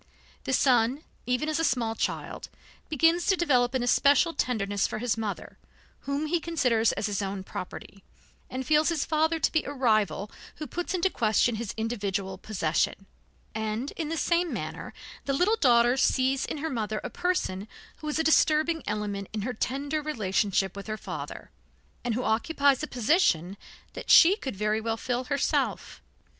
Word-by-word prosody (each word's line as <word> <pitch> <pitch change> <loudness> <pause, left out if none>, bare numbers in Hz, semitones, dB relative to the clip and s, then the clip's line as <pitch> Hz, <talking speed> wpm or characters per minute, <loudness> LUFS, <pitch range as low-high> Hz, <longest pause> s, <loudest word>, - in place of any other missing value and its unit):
The - - -2
son, 255 +2 +3 0.2
even 250 +5 0
as 310 +1 0
a - - +1
small 235 -7 +1
child, - - -4 0.4
begins 330 +3 +2
to 385 - +4
develop 260 -8 +2
an 255 - +1
especial 285 +6 +4
tenderness 205 -8 0
for - - -5
his 235 0 0
mother, 220 -3 -5 0.5
whom 280 +2 -1
he 340 +3 0
considers 250 -9 +1
as - - -3
his 205 -1 -1
own 195 -1 -4
property, 190 +1 -8 0.5
and 260 +1 -4
feels 305 +2 +3
his 330 -4 0
father 320 +1 +1
to - - +1
be 320 - +1
a - - -5
rival 215 - +1 0.2
who 305 - -6
puts 350 +3 -3
into 370 +1 +1
question 225 +1 +2
his 225 -2 -5
individual 200 -4 -3
possession; 185 -1 -1 0.5
and 220 +4 -3
in 320 -3 -4
the 325 - -2
same 345 +1 +1
manner - - -5 0.3
the 275 - 0
little 365 +10 +3
daughter 240 - +4
sees 265 0 +2
in - - -4
her 320 +2 -3
mother 215 -3 -2
a - - -5
person 355 - -1 0.3
who 305 - -8
is 300 - -1
a 320 - +1
disturbing 315 +1 +3
element 205 -2 -3
in 215 -2 -3
her 250 +3 -2
tender 280 +6 -2
relationship 200 -8 0
with 200 +1 -8
her 215 0 -3
father, - - -7 0.5
and 240 -2 -1
who 250 - -2
occupies 280 +4 +2
a 305 - -3
position 215 - +1 0.4
that - - -8
she 360 +4 +8
could 265 - -6
very 210 +2 0
well 225 0 -2
fill 250 +2 -2
herself. 280 +1 -1
250 Hz, 175 wpm, -27 LUFS, 215-305 Hz, 0.5 s, she